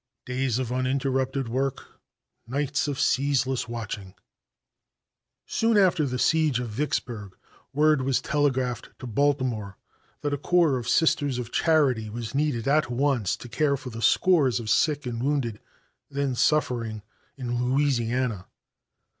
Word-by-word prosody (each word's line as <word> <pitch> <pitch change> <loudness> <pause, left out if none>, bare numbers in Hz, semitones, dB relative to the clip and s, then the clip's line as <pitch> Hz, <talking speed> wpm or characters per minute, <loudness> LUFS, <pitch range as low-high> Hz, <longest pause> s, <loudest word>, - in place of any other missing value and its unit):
Days 125 -2 -1
of 125 -2 -3
uninterrupted 130 0 0
work; 130 +3 -3 0.5
nights 145 +3 -1
of 145 -1 -3
ceaseless 130 -2 +1
watching. 105 -5 -6 1.3
Soon 225 -1 +1
after 180 -6 +3
the 125 0 -2
siege 155 -2 +2
of 125 -2 -4
Vicksburg 110 -5 -3 0.3
word 150 0 +3
was 130 0 +1
telegraphed 130 -4 -1
to - - -9
Baltimore 125 -5 0 0.4
that 145 -1 -1
a 145 - -2
corps 165 -4 +3
of 120 - -5
Sisters 145 -5 +2
of 120 -1 -5
Charity 135 -9 +2
was 115 +2 -6
needed 140 -5 0
at 150 -1 +3
once 125 -5 0
to - - -10
care 140 +3 +1
for 130 -2 -8
the 115 0 -7
scores 145 - +3
of 110 -2 -3
sick 150 -3 +2
and 120 -1 -3
wounded 130 -6 -1 0.5
then 140 -2 -1
suffering 120 -6 0 0.3
in 120 -2 -2
Louisiana. 125 -6 0
130 Hz, 135 wpm, -26 LUFS, 120-145 Hz, 1.3 s, after